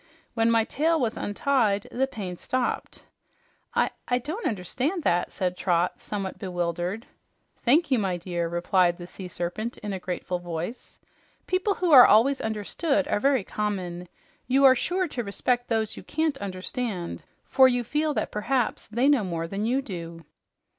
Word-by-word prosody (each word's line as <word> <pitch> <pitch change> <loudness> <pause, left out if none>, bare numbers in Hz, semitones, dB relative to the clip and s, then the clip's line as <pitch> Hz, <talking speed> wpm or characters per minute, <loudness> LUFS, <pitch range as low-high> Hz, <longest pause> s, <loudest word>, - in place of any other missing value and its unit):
When 225 -1 +2
my 230 -1 +4
tail 320 +7 +1
was 235 -4 0
untied, 205 -2 +1
the 265 +2 0
pain 195 -8 -6
stopped." 255 +7 -3 0.7
"I - - +2 0.2
I 245 - +2
don't 315 - -3
understand 260 - -2
that," 175 -5 +1
said 180 -1 -2
Trot, 175 -1 0
somewhat 195 -2 -5
bewildered. 175 +4 -3 0.6
"Thank 290 +5 +3
you, 255 - +4
my 190 -3 -1
dear," 175 -1 -3
replied 175 0 +2
the 175 - -8
Sea 185 +1 -9
Serpent 180 +7 -4
in 210 -1 -5
a 190 - -3
grateful 180 0 -3
voice. 175 +6 -6 0.5
"People 370 +2 0
who 360 -2 0
are 255 -4 +10
always 260 +6 +4
understood 265 - -1
are - - +1
very 270 -2 +2
common. 180 -4 -3 0.4
You 270 +2 +4
are 260 - +9
sure 360 +8 0
to 245 -4 -3
respect 245 +4 -1
those 220 -2 0
you - - -8
can't 315 -2 -1
understand, 190 0 -4 0.2
for 265 -1 +6
you 245 -1 +1
feel 300 +4 -1
that - - -1
perhaps 240 +3 -1
they 235 +5 +1
know 285 -6 +4
more 170 -3 -3
than 200 +5 -2
you 265 +3 +1
do." 170 - -7
220 Hz, 165 wpm, -26 LUFS, 180-265 Hz, 0.7 s, are